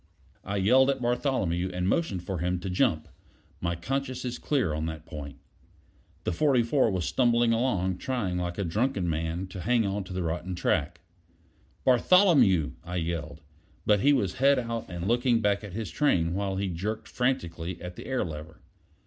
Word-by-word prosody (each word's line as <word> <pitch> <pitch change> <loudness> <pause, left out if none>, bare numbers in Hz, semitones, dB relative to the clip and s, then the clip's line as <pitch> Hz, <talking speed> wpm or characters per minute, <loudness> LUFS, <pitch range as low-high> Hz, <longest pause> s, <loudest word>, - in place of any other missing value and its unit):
I 100 - -4
yelled 130 +8 +5
at 140 - 0
Bartholomew, 120 - 0
and 90 0 -1
motioned 100 - 0
for 95 -1 -4
him 90 +2 0
to 95 - -4
jump; 90 - +1 0.5
my 85 0 -1
conscience 130 +8 -3
is 125 - -4
clear 130 - 0
on 80 +1 -2
that 80 -1 -6
point. 75 -3 -8 0.9
The - - -1
44 130 - +3
was 95 -5 -1
stumbling 120 -2 +3
along, 95 -7 0
trying 105 -9 -2
like 90 0 -3
a 100 - -1
drunken 100 +2 0
man 80 +2 -2
to 95 0 -7
hang 105 -4 +1
to 95 - -10
the 90 0 -2
rotten 85 +3 -3
track. 85 - -1 0.8
"Bartholomew!" 130 - +5
I 90 - -6
yelled; 80 -2 -3 0.4
but 105 -1 +4
he 140 +7 +4
was 100 -10 +1
head 140 +1 +5
out 115 -2 -3
and 90 0 -4
looking 120 0 +3
back 105 -1 +1
at 100 -4 -8
his 105 -4 -4
train 85 - +2
while 95 0 -1
he 100 +1 -1
jerked 105 +6 -4
frantically 85 -9 -2
at 90 +1 -7
the - - -9
air 130 -6 0
lever. 80 -1 -8
95 Hz, 175 wpm, -28 LUFS, 85-120 Hz, 0.9 s, yelled